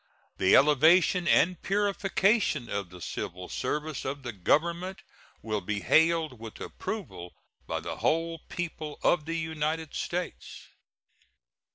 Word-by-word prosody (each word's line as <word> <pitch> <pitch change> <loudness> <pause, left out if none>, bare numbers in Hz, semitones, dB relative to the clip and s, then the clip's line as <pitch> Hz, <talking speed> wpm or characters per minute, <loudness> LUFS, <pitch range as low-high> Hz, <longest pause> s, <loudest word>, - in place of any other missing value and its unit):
The 95 - +5
elevation 160 +5 +5
and 180 0 +3
purification 195 - +1
of 100 -3 -3
the 90 0 -12
civil 90 +3 -5
service 150 0 -3
of 140 +1 -4
the 120 -2 -5
Government 170 - 0 0.4
will 110 -2 -2
be 100 +2 -3
hailed 160 -4 +3
with 115 -1 -9
approval 130 - -6 0.3
by - - -2
the - - -5
whole 165 +1 0
people 160 -3 -5
of 165 -4 +3
the 165 +1 -2
United 160 -1 -2
States. 180 0 -5
160 Hz, 125 wpm, -28 LUFS, 120-175 Hz, 0.4 s, The